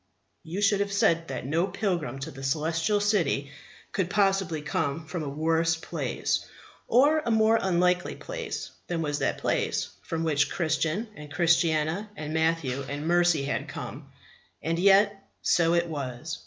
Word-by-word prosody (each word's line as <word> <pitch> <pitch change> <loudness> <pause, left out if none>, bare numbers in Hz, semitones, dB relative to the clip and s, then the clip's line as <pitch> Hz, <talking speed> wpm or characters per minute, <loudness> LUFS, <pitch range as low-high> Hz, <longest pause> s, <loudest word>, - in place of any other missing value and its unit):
You 180 +6 -4
would 205 - +1
have 200 0 -1
said 170 -6 +2
that 130 -2 -5
no 165 +7 +1
pilgrim 175 - -2
to 160 +4 -5
the 135 - -10
Celestial 160 +8 0
City 195 -9 +1 0.4
could 190 -3 -1
possibly 195 -5 +1
have 150 - -10
come 155 +2 -1
from 160 +2 -4
a 145 - -3
worse 160 +3 +1
place, 160 - -2 0.4
or 290 +5 +5
a 305 - -3
more 220 0 +4
unlikely 180 -1 +1
place, - - -5 0.2
than 170 -2 -1
was 145 -1 -1
that - - 0
place - - -1
from 165 0 -3
which 145 -2 +2
Christian 165 +5 0
and 150 -1 -10
Christiana 165 +3 +2
and 150 -2 -5
Matthew 160 -5 0
and 145 +2 -4
Mercy 175 -3 +3
had 140 - -2
come. - - -8 0.5
And 165 +1 0
yet 200 +1 +4 0.2
so 170 -1 +3
it 170 0 +2
was. 145 -1 -5
165 Hz, 160 wpm, -27 LUFS, 155-195 Hz, 0.5 s, or